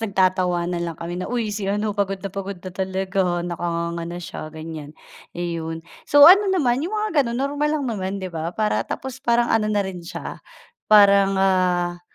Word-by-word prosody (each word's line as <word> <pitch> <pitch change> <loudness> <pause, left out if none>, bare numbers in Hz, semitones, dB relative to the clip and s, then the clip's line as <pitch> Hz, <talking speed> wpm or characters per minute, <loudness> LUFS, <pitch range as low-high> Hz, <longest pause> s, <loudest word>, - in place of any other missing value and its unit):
nagtatawanan 185 -4 0
lang 170 -2 -4
kami 175 +2 -5
na, 185 - -4
"Uy, 230 -4 -2
si 205 -2 -3
ano, 210 +1 -1
pagod 200 -1 -1
na 195 - -4
pagod 195 0 -5
na 180 0 -9
talaga, 190 -2 -1
nakanganga 170 -1 -3
na 175 - -6
siya." 165 -2 -7
Ganyan, 155 -1 -9 0.4
iyon. 165 -1 -4 0.2
So, 290 0 +8
ano 390 +4 +8
naman 270 -10 +1
'yong 370 +8 -3
mga 425 0 -1
gano'n 235 -3 -1
normal 285 +3 -1
lang 285 - -3
naman 195 -5 -3
'di 185 - -6
ba, 165 +1 -4
para 215 -1 +1
tapos 265 0 -6
parang 235 0 +2
ano 215 -1 +2
na 205 -2 +1
rin 185 -2 -6
siya, 170 - -8 0.5
parang, 200 -2 +6
ah, 180 -2 +1
190 Hz, 185 wpm, -22 LUFS, 175-220 Hz, 0.5 s, So